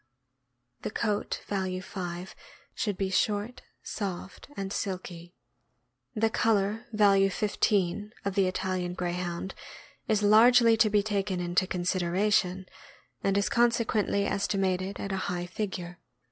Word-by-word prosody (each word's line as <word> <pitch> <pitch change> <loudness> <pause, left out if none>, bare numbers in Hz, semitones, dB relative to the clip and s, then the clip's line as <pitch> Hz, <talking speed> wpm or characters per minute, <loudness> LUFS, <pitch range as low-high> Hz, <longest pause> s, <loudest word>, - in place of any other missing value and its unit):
The - - -3
coat 210 -1 -2
(value 190 -2 -2
5) 180 -1 -6 0.4
should 205 -6 -2
be 190 -1 -1
short, 210 +5 0 0.2
soft, 195 0 -5
and 195 0 -3
silky. 180 -3 -5 0.8
The 220 +1 +2
color 220 +1 +1
(value 200 -3 +4
15) 205 0 0
of 200 - -1
the 195 -1 +3
Italian 185 -1 -2
Greyhound 175 +1 -3 0.5
is 210 -1 +2
largely 230 +2 +7
to 220 -1 +4
be 205 -1 +3
taken 200 -3 -1
into 175 +1 +1
consideration, 185 +1 +1 0.6
and 195 0 +2
is 200 - +2
consequently 230 -4 +2
esti 200 0 -1
mated 190 0 -1
at 200 - -4
a 195 - -1
high 175 -1 -2
figure. 180 -2 -5
195 Hz, 125 wpm, -28 LUFS, 185-210 Hz, 0.8 s, largely